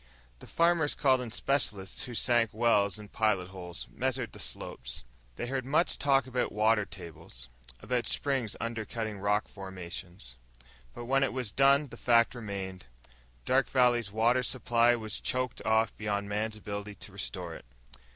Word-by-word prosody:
The -, -, -12 dB
farmers 170 Hz, -3 st, +3 dB
called 130 Hz, -3 st, +3 dB
in 125 Hz, -, -5 dB
specialists 110 Hz, -7 st, -1 dB
who 120 Hz, -, -7 dB
sank 120 Hz, -1 st, +3 dB
wells 110 Hz, -3 st, +3 dB
and 105 Hz, -1 st, -11 dB
pilot 105 Hz, -5 st, +1 dB
holes, 90 Hz, -3 st, -7 dB
measured 130 Hz, -1 st, -1 dB
the -, -, -12 dB
slopes. 60 Hz, 0 st, -5 dB, 0.3 s
They -, -, -3 dB
heard 130 Hz, +1 st, -2 dB
much 150 Hz, +7 st, +1 dB
talk 135 Hz, -2 st, +3 dB
about 125 Hz, -1 st, -1 dB
water 105 Hz, 0 st, +3 dB
tables, 80 Hz, -10 st, -9 dB, 0.3 s
about 125 Hz, -2 st, -1 dB
springs 135 Hz, -7 st, 0 dB
undercutting 110 Hz, -2 st, -3 dB
rock 105 Hz, +2 st, +1 dB
formations. 90 Hz, -, -8 dB, 0.6 s
But 120 Hz, -, -6 dB
when 135 Hz, +2 st, +3 dB
it 135 Hz, -, +1 dB
was 125 Hz, -5 st, -2 dB
done 140 Hz, +4 st, +5 dB
the -, -, -10 dB
fact 115 Hz, -1 st, +4 dB
remained: 100 Hz, -, -6 dB, 0.6 s
Dark 135 Hz, +1 st, +3 dB
Valley's 120 Hz, -5 st, +3 dB
water 115 Hz, +4 st, +3 dB
supply 120 Hz, -1 st, +3 dB
was 110 Hz, -3 st, -4 dB
choked 125 Hz, -1 st, -1 dB
off 110 Hz, 0 st, +3 dB
beyond 100 Hz, -1 st, -1 dB
man's 105 Hz, +1 st, -2 dB
ability 105 Hz, 0 st, -6 dB
to 100 Hz, -, -9 dB
restore 90 Hz, -3 st, -4 dB
it. -, -, -10 dB
110 Hz, 155 wpm, -30 LUFS, 100-125 Hz, 0.6 s, done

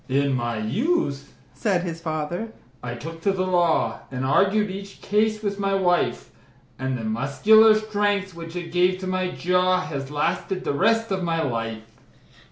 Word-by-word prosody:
"In 140 Hz, +1 st, +2 dB
my 120 Hz, -2 st, -1 dB
youth," 140 Hz, -, -1 dB, 0.2 s
said 195 Hz, -5 st, 0 dB
his 165 Hz, -2 st, -5 dB
fater, 160 Hz, +6 st, -3 dB, 0.3 s
"I 120 Hz, 0 st, -5 dB
took 165 Hz, +6 st, -8 dB
to 195 Hz, -, +2 dB
the 185 Hz, -1 st, -1 dB
law, 170 Hz, -10 st, +1 dB
And 130 Hz, 0 st, -3 dB
argued 200 Hz, +8 st, +2 dB
each 195 Hz, +1 st, -8 dB
case 215 Hz, +1 st, 0 dB
with 200 Hz, -1 st, -2 dB
my 195 Hz, -1 st, +1 dB
wife; 180 Hz, -2 st, +1 dB, 0.5 s
And 130 Hz, -1 st, -2 dB
the 115 Hz, -, -6 dB
muscular 140 Hz, -, +5 dB
strength, 205 Hz, -3 st, 0 dB
which 165 Hz, 0 st, -9 dB
it 175 Hz, -2 st, -5 dB
gave 180 Hz, +1 st, +3 dB
to -, -, -4 dB
my 185 Hz, 0 st, -1 dB
jaw, 180 Hz, +1 st, +1 dB
Has 140 Hz, -6 st, -5 dB
lasted 185 Hz, +5 st, -1 dB
the 145 Hz, -, -1 dB
rest 225 Hz, +7 st, +2 dB
of 190 Hz, -1 st, 0 dB
my 165 Hz, -2 st, 0 dB
life." 115 Hz, -4 st, -3 dB
180 Hz, 170 wpm, -24 LUFS, 140-200 Hz, 0.5 s, muscular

